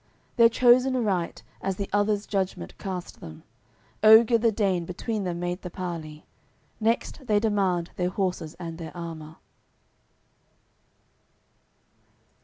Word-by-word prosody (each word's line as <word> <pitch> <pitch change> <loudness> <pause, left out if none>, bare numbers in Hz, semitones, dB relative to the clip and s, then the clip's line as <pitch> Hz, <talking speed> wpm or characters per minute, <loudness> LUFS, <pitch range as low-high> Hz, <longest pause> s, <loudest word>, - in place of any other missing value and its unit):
They're 230 -1 +7
chos'n 250 +2 +4
aright, 195 -8 -1 0.2
as 195 -1 -2
the 200 +1 -4
others' 205 0 +1
judgement 190 - -3
cast 185 -2 -6
them; 80 -1 -11 0.6
Oger 225 +2 +7
the 230 0 +3
Dane 195 -5 0
between 200 +4 -4
them 175 -1 -3
made 175 +1 -3
the 180 - -6
parley. 165 -4 -6 0.5
Next 230 +4 -1
they 210 -1 +3
demand 195 -5 0
their 180 0 0
horses 180 -5 -3
and 165 -2 -7
their 165 +1 -8
armour. 160 -2 -7
190 Hz, 120 wpm, -26 LUFS, 170-215 Hz, 0.6 s, They're